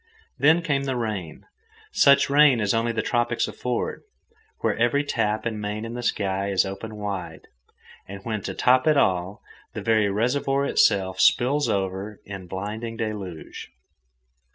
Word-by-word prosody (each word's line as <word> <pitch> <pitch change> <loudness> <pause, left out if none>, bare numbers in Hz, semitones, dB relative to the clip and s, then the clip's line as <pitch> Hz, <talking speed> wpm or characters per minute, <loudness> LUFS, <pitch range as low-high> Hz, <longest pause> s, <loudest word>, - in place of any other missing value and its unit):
Then 160 +6 +4
came 140 -4 0
the 135 -1 -1
rain, 105 -9 -4 0.5
such 140 - +5
rain 140 -3 +5
as 105 -2 +1
only 115 +1 +1
the 110 -2 -2
tropics 120 0 0
afford, 125 -1 -3 0.6
where - - +1
every 120 +5 +2
tap 110 -6 -1
and 110 -2 -3
main 105 +1 -4
in 115 - -6
the 120 - -5
sky 100 -4 -1
is 95 -2 +2
open 100 +3 -7
wide, 100 -3 -5 0.7
and 100 +1 -8
when, 110 -3 -2
to 95 0 -5
top 130 +3 +3
it 155 -2 +4
all, 95 -3 0 0.3
the - - -4
very 110 -2 +2
reservoir 135 +6 0
itself 95 -7 +2
spills 135 +9 +3
over 95 +1 -3
in 95 -2 -8
blinding 105 +5 -5
deluge. 105 -7 -6
110 Hz, 155 wpm, -24 LUFS, 100-125 Hz, 0.7 s, such